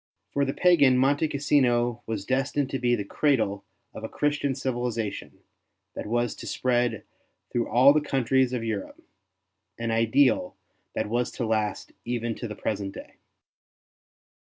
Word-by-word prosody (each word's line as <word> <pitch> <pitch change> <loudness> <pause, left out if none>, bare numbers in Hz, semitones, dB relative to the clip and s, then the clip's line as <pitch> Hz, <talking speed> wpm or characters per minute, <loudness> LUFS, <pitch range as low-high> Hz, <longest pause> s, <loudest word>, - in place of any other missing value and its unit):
For 140 0 +1
the 135 - -2
pagan 145 -8 +5
Monte 140 +4 +2
Cassino 120 -5 +1
was 110 -3 -3
destined 135 +2 0
to 135 - -2
be 120 -1 +2
the 105 - -3
cradle 110 -6 0 0.3
of - - -9
a - - -4
Christian 145 -2 0
civilization 120 -5 -3 0.5
that - - -6
was 120 +1 0
to. - - -8
spread 120 -3 0 0.5
through 120 -1 -1
all 130 +4 +6
the 155 - +2
countries 130 -2 +1
of 125 -3 -2
Europe 110 -4 -4 0.4
— - - -54 0.3
an 115 0 -2
ideal 115 +3 +2 0.4
that - - -1
was 120 +3 0
to 120 - -3
last 110 -1 -1
even 120 -1 -2
to 120 - -6
the 105 - -7
present 100 -1 -3
day. - - -11
120 Hz, 155 wpm, -26 LUFS, 115-135 Hz, 0.5 s, all